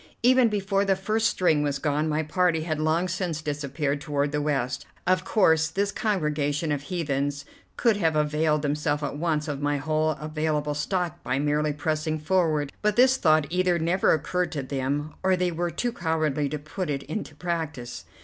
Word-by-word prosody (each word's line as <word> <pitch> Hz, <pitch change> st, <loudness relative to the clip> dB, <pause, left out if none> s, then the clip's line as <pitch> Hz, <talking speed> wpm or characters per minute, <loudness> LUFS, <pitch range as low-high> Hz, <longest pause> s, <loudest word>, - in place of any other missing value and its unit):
Even 255 Hz, -1 st, +5 dB
before 200 Hz, -1 st, 0 dB
the 195 Hz, -1 st, +2 dB
first 215 Hz, +4 st, +1 dB
string 160 Hz, -5 st, +2 dB
was 145 Hz, -1 st, 0 dB
gone, 150 Hz, +2 st, 0 dB
my 155 Hz, +1 st, 0 dB
party 165 Hz, +1 st, +1 dB
had 155 Hz, -2 st, -2 dB
long 160 Hz, +3 st, +1 dB
since 180 Hz, -3 st, -2 dB
disappeared 145 Hz, -1 st, -2 dB
toward 145 Hz, -2 st, -1 dB
the 150 Hz, 0 st, -1 dB
west. 135 Hz, -4 st, -1 dB, 0.2 s
Of 185 Hz, 0 st, +2 dB
course 160 Hz, -5 st, +3 dB
this 200 Hz, +5 st, -1 dB
congregation 150 Hz, -7 st, -1 dB
of 145 Hz, -2 st, -1 dB
heathens 145 Hz, -3 st, -2 dB, 0.3 s
could 230 Hz, -4 st, +3 dB
have 165 Hz, -5 st, +1 dB
availed 150 Hz, 0 st, +1 dB
themselves 150 Hz, 0 st, 0 dB
at 145 Hz, -, -3 dB
once 155 Hz, -1 st, 0 dB
of 145 Hz, -2 st, -3 dB
my 145 Hz, 0 st, +1 dB
whole 155 Hz, +2 st, 0 dB
available 155 Hz, -1 st, -1 dB
stock 175 Hz, +3 st, -2 dB
by 125 Hz, -, -1 dB
merely 150 Hz, +1 st, +1 dB
pressing 155 Hz, +1 st, -1 dB
forward, 155 Hz, -3 st, +1 dB
but 210 Hz, -1 st, +1 dB
this 260 Hz, +2 st, +5 dB
thought 155 Hz, -, +4 dB
either 180 Hz, -1 st, +2 dB
never 170 Hz, +3 st, +2 dB
occurred 180 Hz, +3 st, 0 dB
to 140 Hz, -3 st, -3 dB
them, 140 Hz, +3 st, -2 dB
or 190 Hz, 0 st, +3 dB
they 180 Hz, -1 st, 0 dB
were 175 Hz, +1 st, -1 dB
too 235 Hz, +8 st, -2 dB
cowardly 155 Hz, -, 0 dB
to 150 Hz, -, -3 dB
put 155 Hz, +4 st, -5 dB
it 140 Hz, -1 st, -2 dB
into 155 Hz, 0 st, -5 dB
practice. 160 Hz, -8 st, -4 dB
155 Hz, 180 wpm, -26 LUFS, 145-180 Hz, 0.3 s, Even